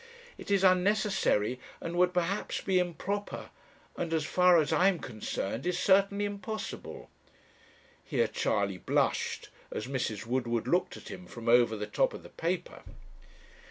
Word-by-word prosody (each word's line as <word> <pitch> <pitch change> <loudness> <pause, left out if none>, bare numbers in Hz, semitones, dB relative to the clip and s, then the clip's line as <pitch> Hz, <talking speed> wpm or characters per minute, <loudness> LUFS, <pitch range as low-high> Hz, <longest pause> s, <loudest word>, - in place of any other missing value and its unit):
It - - -11
is 200 -1 +3
unnecessary, 185 - +2 0.2
and 170 - -5
would 180 0 +4
perhaps 180 +3 -1
be 190 -2 +2
improper, 180 +4 -3 0.4
and 170 - -3
as 155 -2 0
far 180 +2 +5
as 155 -2 +2
I 185 - +4
am 195 -3 +3
concerned, 115 - -4
is 180 -1 0
certainly 200 +2 +3
impossible." 205 +2 -6 0.9
Here - - +1
Charley 100 -2 -1
blushed, - - 0 0.2
as - - -4
Mrs. 120 -5 -3
Woodward 120 -1 -1
looked 180 +2 +1
at - - -11
him 180 - -9
from 115 -1 -9
over 120 -1 +5
the 105 - -3
top 105 - +1
of - - -10
the - - -12
paper. 175 +1 -3
175 Hz, 150 wpm, -30 LUFS, 120-190 Hz, 0.9 s, far